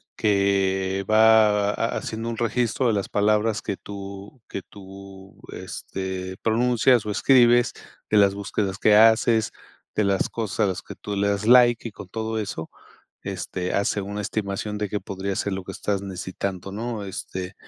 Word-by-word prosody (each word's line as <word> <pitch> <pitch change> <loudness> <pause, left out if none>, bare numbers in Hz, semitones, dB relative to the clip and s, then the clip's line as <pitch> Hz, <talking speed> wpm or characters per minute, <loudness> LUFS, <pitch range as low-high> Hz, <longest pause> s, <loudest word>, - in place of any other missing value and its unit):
que 95 -2 +1
va 110 -2 +5
haciendo 115 0 -3
un 115 - -4
registro 120 +2 0
de 115 - +2
las 100 -2 -1
palabras 105 +1 +1
que 100 - -4
tú 100 +3 -9
que 100 - -5
tú, 95 -1 -13
este, 95 0 -6
pronuncias 120 +1 +3
o 105 - -2
escribes, 120 +1 +4 0.4
de 105 - +3
las 100 -1 +5
búsquedas 100 -1 -3
que 105 -1 +5
haces, 110 0 +4 0.4
de 105 - +2
las 100 -1 +1
cosas 110 -1 -3
a 105 - +5
las 90 -1 -4
que - - -10
tú 105 -1 -6
le 100 +1 +1
das 100 +1 -1
like 120 -1 +5
y - - -8
con 100 - -11
todo 110 +1 -3
eso, 80 -6 -5 0.5
este, 90 0 -4
hace 100 0 0
una 100 +1 -5
estimación 105 0 -3
de 105 -1 -3
qué 105 - -2
podría 95 0 -4
ser 100 0 -2
lo 95 -1 -5
que 95 - -7
estás 100 0 -2
necesitando, 95 0 -5
¿no? 110 0 -4
Este, 95 0 -6
100 Hz, 165 wpm, -24 LUFS, 95-110 Hz, 0.5 s, va